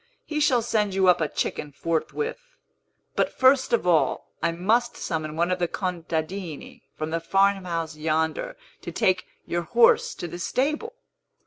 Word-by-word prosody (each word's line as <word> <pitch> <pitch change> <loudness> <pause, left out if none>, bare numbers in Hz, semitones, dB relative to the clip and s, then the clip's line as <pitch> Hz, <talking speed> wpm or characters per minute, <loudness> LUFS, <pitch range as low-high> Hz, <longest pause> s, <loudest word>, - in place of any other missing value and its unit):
He 305 -1 -2
shall 250 -5 +3
send 210 -4 0
you 190 -1 +3
up 180 -1 +5
a 155 - +2
chicken 150 0 -3
forthwith. 165 - -2 0.8
But, - - +1
first 260 +1 +4
of 235 - +2
all, 160 -7 +2
I 170 - +2
must 220 +8 +1
summon 155 -3 -3
one 170 +2 +1
of 180 - 0
the 175 - +1
contadini 170 -1 -4 0.2
from 155 +1 -3
the 165 - 0
farmhouse 180 -3 +1
yonder, 160 - -1 0.2
to - - -6
take 185 -1 +1 0.2
your 175 - -1
horse 230 +7 +4
to 175 - -5
the 175 +1 -7
stable." 305 - -1
180 Hz, 155 wpm, -25 LUFS, 160-230 Hz, 0.8 s, up